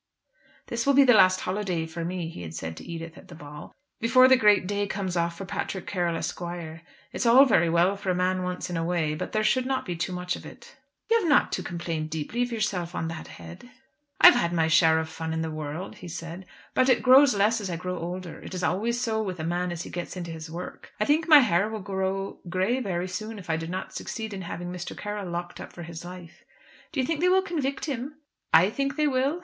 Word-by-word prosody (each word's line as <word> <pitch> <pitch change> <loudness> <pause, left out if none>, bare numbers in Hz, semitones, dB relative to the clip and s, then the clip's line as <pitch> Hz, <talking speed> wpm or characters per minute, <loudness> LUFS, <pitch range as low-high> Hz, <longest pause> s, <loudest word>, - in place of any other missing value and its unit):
"This 235 +2 -3
will 280 - +5
be 280 - +8
the 250 -2 +6
last 185 -3 +5
holiday 185 -4 -2
for 165 +1 -6
me," 175 0 -3
he 165 - -8
had 80 -2 -7
said 80 0 -5
to - - -9
Edith 165 -1 -7
at - - -16
the 170 - -11
ball, 150 -1 -10 0.3
"before 255 +3 +6
the 260 - +7
great 210 -6 +4
day 205 +1 -1
comes 190 -2 -3
off 170 0 -1
for 195 - -6
Patrick 190 0 -4
Carroll, 175 -3 -1
Esq. - - -4 0.7
It's 240 - -1
all 255 +4 +8
very 170 -10 +3
well 175 +4 +3
for 195 -1 -5
a 180 - +2
man 185 +1 +1
once 180 0 -3
in 175 - -4
a 165 - -1
way, 165 -3 0
but 155 - -5
there 215 0 0
should 255 +4 +2
not 265 -1 -1
be 175 - -3
too 175 +3 -3
much 180 0 -2
of - - -10
it." 480 0 -13 0.3
"You 460 0 +4
have 355 -7 -1
not 290 - +4
to - - -2
complain 170 -3 -4
deeply 160 +9 -3
of 245 0 0
yourself 195 -6 -2
on 165 - -2
that 165 -1 -7
head." 85 - -11 0.5
"I - - +6
have 360 - +12
had 170 - +1
my 165 -2 +2
share 160 0 +5
of 160 0 -1
fun 160 0 -5
in 160 0 -1
the 160 - -3
world," 155 +4 -6
he - - -10
said; 170 +2 -7 0.3
"but 255 +1 +3
it 250 - +3
grows 260 -1 +7
less 215 +3 +2
as 195 - -4
I 175 - -2
grow 180 +1 -4
older. 175 0 -6
It - - -8
is 180 - -4
always 235 +5 0
so 225 -3 0
with 185 -5 -4
a - - -3
man 175 +2 -1
as 175 -1 -4
he - - -9
gets 175 +1 -5
into 170 -2 -5
his 160 0 -8
work. 175 +3 -8
I 215 - +2
think 310 +4 +2
my 305 -3 +9
hair 200 -3 +2
will 220 -1 -5
grow 195 0 -3
grey 190 +8 +1
very 185 -6 -2
soon, 215 +4 -5
if 180 -4 -5
I - - +2
do 165 0 -4
not 185 +2 -5
succeed 220 -2 -5
in 195 - -5
having 175 0 -6
Mr. 180 -1 -6
Carroll 205 -3 -5
locked 175 0 -5
up - - -9
for 175 - -9
his 170 0 -8
life." 175 -1 -11 0.5
"Do 310 - -3
you 260 - +2
think 325 0 -1
they 360 +2 +3
will 380 +1 +4
convict 290 -7 -2
him?" 280 0 -4 0.4
"I 185 +5 +6
think 275 +3 -2
they 305 0 +1
will? 275 +4 +1
185 Hz, 255 wpm, -26 LUFS, 170-230 Hz, 0.7 s, have